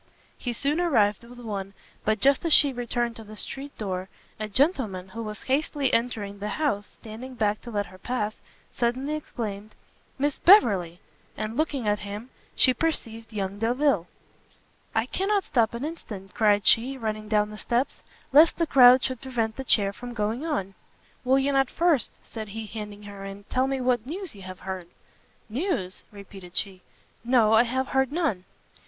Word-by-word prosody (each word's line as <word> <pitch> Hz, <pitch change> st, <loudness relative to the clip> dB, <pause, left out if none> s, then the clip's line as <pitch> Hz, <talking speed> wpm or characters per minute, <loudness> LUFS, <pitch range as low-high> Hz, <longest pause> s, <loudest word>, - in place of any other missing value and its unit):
He 245 Hz, -, -4 dB
soon 280 Hz, +7 st, 0 dB
arrived 220 Hz, -, +2 dB
with 245 Hz, +1 st, -13 dB
one; 200 Hz, -4 st, -5 dB, 0.3 s
but 215 Hz, 0 st, +1 dB
just 275 Hz, +4 st, +3 dB
as 335 Hz, -, +1 dB
she 285 Hz, -2 st, +7 dB
returned 240 Hz, -1 st, -2 dB
to 225 Hz, -, -9 dB
the 215 Hz, 0 st, -11 dB
street 275 Hz, +6 st, -6 dB
door, 190 Hz, -3 st, -3 dB, 0.3 s
a 215 Hz, -1 st, -3 dB
gentleman, 215 Hz, -, +1 dB
who 230 Hz, +4 st, -6 dB
was 215 Hz, -2 st, -5 dB
hastily 280 Hz, 0 st, 0 dB
entering 215 Hz, -4 st, -1 dB
the 205 Hz, -, -3 dB
house, 275 Hz, -10 st, -1 dB
standing 235 Hz, +4 st, -9 dB
back 210 Hz, -2 st, 0 dB
to 240 Hz, -, -9 dB
let 205 Hz, -3 st, -1 dB
her 185 Hz, 0 st, -14 dB
pass, 215 Hz, -1 st, -3 dB, 0.3 s
suddenly 255 Hz, +5 st, -1 dB
exclaimed, 215 Hz, -8 st, -5 dB, 0.4 s
"Miss 285 Hz, +1 st, 0 dB
Beverley!" 200 Hz, -, +5 dB, 0.4 s
and 215 Hz, +1 st, -3 dB
looking 275 Hz, -5 st, -1 dB
at 210 Hz, 0 st, +2 dB
him, 205 Hz, +5 st, -7 dB, 0.2 s
she 255 Hz, -, +5 dB
perceived 230 Hz, -7 st, -3 dB
young 200 Hz, -1 st, -3 dB
Delvile. 235 Hz, -, +2 dB, 0.9 s
"I 225 Hz, +1 st, +2 dB
cannot 390 Hz, +8 st, 0 dB
stop 235 Hz, -3 st, +1 dB
an 240 Hz, +5 st, -3 dB
instant," 210 Hz, -, -8 dB
cried 205 Hz, -3 st, +3 dB
she, 260 Hz, +4 st, +4 dB
running 215 Hz, -3 st, -3 dB
down 210 Hz, -1 st, +1 dB
the -, -, -8 dB
steps, 245 Hz, +3 st, -1 dB, 0.3 s
"lest 310 Hz, +4 st, +7 dB
the 335 Hz, -, +2 dB
crowd 255 Hz, -3 st, +7 dB
should 260 Hz, -3 st, -2 dB
prevent 230 Hz, -4 st, -2 dB
the 265 Hz, -, -5 dB
chair 200 Hz, -5 st, +3 dB
from 245 Hz, +3 st, -8 dB
going 220 Hz, +5 st, -1 dB
on." 275 Hz, -, -2 dB, 0.5 s
"Will 260 Hz, +1 st, +4 dB
you 270 Hz, +1 st, +2 dB
not 270 Hz, -2 st, +2 dB
first," 335 Hz, -7 st, +2 dB
said 220 Hz, -2 st, -7 dB
he, 220 Hz, +2 st, -6 dB
handing 210 Hz, -1 st, -8 dB
her 200 Hz, -1 st, -9 dB
in, 195 Hz, +1 st, -8 dB
"tell 260 Hz, +1 st, +2 dB
me 270 Hz, 0 st, -1 dB
what 250 Hz, -2 st, +1 dB
news 370 Hz, +5 st, -4 dB
you 200 Hz, -, -13 dB
have 185 Hz, 0 st, -9 dB
heard?" 185 Hz, -2 st, -5 dB, 0.6 s
"News?" 230 Hz, -, -2 dB
repeated 195 Hz, -3 st, -11 dB
she. 190 Hz, -2 st, -2 dB, 0.4 s
"No, 235 Hz, -3 st, +4 dB
I 220 Hz, -, +7 dB
have 260 Hz, +2 st, -1 dB
heard 265 Hz, 0 st, +1 dB
none!" 290 Hz, -, -1 dB
230 Hz, 175 wpm, -26 LUFS, 205-265 Hz, 0.9 s, she